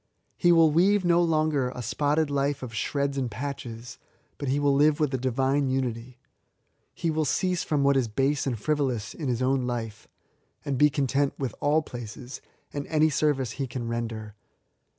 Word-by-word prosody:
He 175 Hz, -, +2 dB
wiQ 165 Hz, -3 st, +5 dB
weave 190 Hz, +4 st, +3 dB
no 175 Hz, 0 st, +4 dB
longer 155 Hz, -5 st, +1 dB
a 125 Hz, -1 st, -7 dB
spotted 145 Hz, +5 st, 0 dB
life 140 Hz, 0 st, 0 dB
of 120 Hz, -3 st, -7 dB
shreds 140 Hz, +5 st, -1 dB
and 130 Hz, -2 st, -1 dB
patches, 120 Hz, -2 st, -6 dB, 0.4 s
but 140 Hz, -, -4 dB
he 135 Hz, +2 st, +1 dB
will 145 Hz, -1 st, +3 dB
live 145 Hz, +1 st, +3 dB
with 150 Hz, -3 st, +1 dB
a -, -, +1 dB
divine 130 Hz, +2 st, +1 dB
unity. 125 Hz, -1 st, -3 dB, 0.8 s
He 165 Hz, -, -1 dB
will 155 Hz, 0 st, 0 dB
cease 180 Hz, +4 st, 0 dB
from 145 Hz, -3 st, 0 dB
what 140 Hz, 0 st, +4 dB
is 130 Hz, -3 st, +2 dB
base 135 Hz, +6 st, 0 dB
and 125 Hz, -4 st, -1 dB
frivolous 135 Hz, -5 st, -1 dB
in 150 Hz, -, -5 dB
his 125 Hz, 0 st, 0 dB
own 130 Hz, -1 st, +1 dB
life, 115 Hz, -3 st, -5 dB, 0.6 s
and 140 Hz, -, -1 dB
be 150 Hz, -, +6 dB
content 140 Hz, 0 st, 0 dB
with 130 Hz, -5 st, -3 dB
all 150 Hz, +2 st, +2 dB
places, 120 Hz, +1 st, -8 dB, 0.3 s
and 145 Hz, -1 st, -4 dB
any 155 Hz, 0 st, +3 dB
sorvice 140 Hz, -5 st, +1 dB
he 135 Hz, -2 st, -2 dB
can 120 Hz, -1 st, -5 dB
render. 115 Hz, -2 st, -4 dB
140 Hz, 180 wpm, -26 LUFS, 125-150 Hz, 0.8 s, be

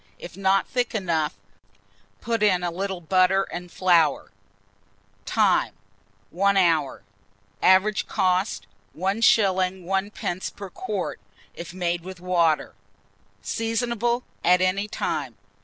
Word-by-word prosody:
If 175 Hz, -, -10 dB
not 195 Hz, 0 st, +2 dB
thick 245 Hz, -2 st, -2 dB
enough, 165 Hz, -, -1 dB, 0.9 s
put 230 Hz, -1 st, -2 dB
in 185 Hz, -4 st, +3 dB
a 175 Hz, -, -1 dB
little 190 Hz, +1 st, -4 dB
butter 185 Hz, +3 st, +3 dB
and 175 Hz, -2 st, -8 dB
flour. 170 Hz, -5 st, +2 dB, 1.0 s
Time. -, -, +2 dB, 0.6 s
hour. 175 Hz, -, +2 dB, 0.6 s
Average 190 Hz, +2 st, +3 dB
cost, 185 Hz, -, 0 dB, 0.3 s
1s. 190 Hz, -1 st, +2 dB
1d. 190 Hz, -1 st, -3 dB
per 200 Hz, -1 st, -8 dB
quart, 210 Hz, -, -4 dB, 0.3 s
if 170 Hz, -1 st, -8 dB
made 175 Hz, -1 st, -1 dB
with 185 Hz, +1 st, -9 dB
water. 170 Hz, -3 st, +1 dB, 0.7 s
Seasonable 235 Hz, -, -1 dB, 0.2 s
at 180 Hz, +1 st, +5 dB
any 185 Hz, +3 st, +1 dB
time. 140 Hz, -, -3 dB
185 Hz, 105 wpm, -24 LUFS, 175-200 Hz, 1.0 s, at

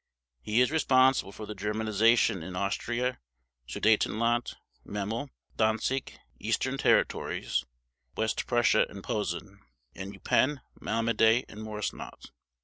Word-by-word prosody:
He 110 Hz, +3 st, +2 dB
is 125 Hz, -, +3 dB
responsible 130 Hz, -8 st, +3 dB
for 105 Hz, -, -8 dB
Germanization 110 Hz, 0 st, +2 dB
in 90 Hz, +3 st, -7 dB
Austria, 120 Hz, +6 st, -1 dB, 0.5 s
Sudetenland, 115 Hz, -, +1 dB, 0.3 s
Memel, 110 Hz, +7 st, -4 dB, 0.3 s
Danzig, 110 Hz, +4 st, 0 dB, 0.2 s
Eastern -, -, -1 dB
territories -, -, +1 dB, 0.5 s
(West 110 Hz, 0 st, -1 dB
Prussia 120 Hz, -2 st, +3 dB
and 100 Hz, -1 st, -10 dB
Posen), 100 Hz, -1 st, -3 dB, 0.3 s
and 95 Hz, +1 st, -7 dB
Eupen, 130 Hz, +7 st, +1 dB, 0.2 s
Malmedy, 115 Hz, +1 st, +2 dB
and 105 Hz, -, -11 dB
Moresnot. 105 Hz, -1 st, -6 dB
110 Hz, 100 wpm, -29 LUFS, 105-120 Hz, 0.5 s, is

